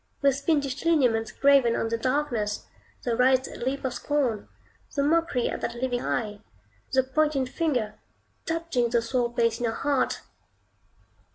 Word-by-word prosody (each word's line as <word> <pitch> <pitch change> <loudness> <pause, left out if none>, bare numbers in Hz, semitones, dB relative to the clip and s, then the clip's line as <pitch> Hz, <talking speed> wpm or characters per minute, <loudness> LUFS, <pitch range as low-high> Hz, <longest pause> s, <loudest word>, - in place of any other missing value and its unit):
those 275 0 +2
fiendish 285 -4 0
lineaments 250 -9 +2
graven 275 -4 +4
on - - 0
the 230 - 0
darkness, 245 -5 -1 0.4
the 240 -2 0
writhed 260 +2 +2
lip 265 +3 -2
of 255 - -1
scorn, 250 -4 -1 0.5
the 280 - +2
mockery 320 -4 +2
of - - -4
that 235 - -3
living 245 -1 -1
eye, 210 -3 -2 0.5
the 260 0 +3
pointed 275 0 +1
finger, 250 -7 -1 0.5
touching 325 -8 0
the 235 0 +3
sore 235 +1 -1
place 230 -1 +1
in 240 - -1
your 225 0 -1
heart! 280 -2 0
260 Hz, 150 wpm, -26 LUFS, 235-285 Hz, 0.5 s, graven